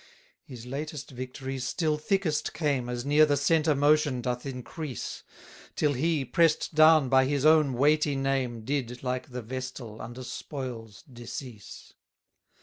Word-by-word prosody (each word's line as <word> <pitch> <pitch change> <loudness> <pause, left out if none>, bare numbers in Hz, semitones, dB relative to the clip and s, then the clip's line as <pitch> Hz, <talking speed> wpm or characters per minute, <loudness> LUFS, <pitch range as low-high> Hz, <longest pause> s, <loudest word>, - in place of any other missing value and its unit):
34 130 - -9
His 120 0 -10
latest 145 +2 -6
victories 130 +1 -6
still 155 +4 0
thickest 160 0 -1
came, 140 -6 0
As 120 0 -4
near 145 +2 +5
the 145 -2 +3
centre 155 +1 +2
motion 145 -2 +3
doth 125 +2 -3
increase; 135 - -6 0.5
Till 150 -1 +2
he, 150 +1 0
press'd 160 +6 +2
down 155 -2 +6
by 130 0 +4
his 140 +1 0
own 155 -3 +5
weighty 145 +3 +2
name, 135 -4 -1
Did, 125 -3 -3
like 125 0 -3
the 125 -1 -5
vestal, 125 -2 -6
under 120 +3 -8
spoils 120 -6 -7
decease. 120 -4 -9
135 Hz, 145 wpm, -28 LUFS, 125-150 Hz, 0.5 s, down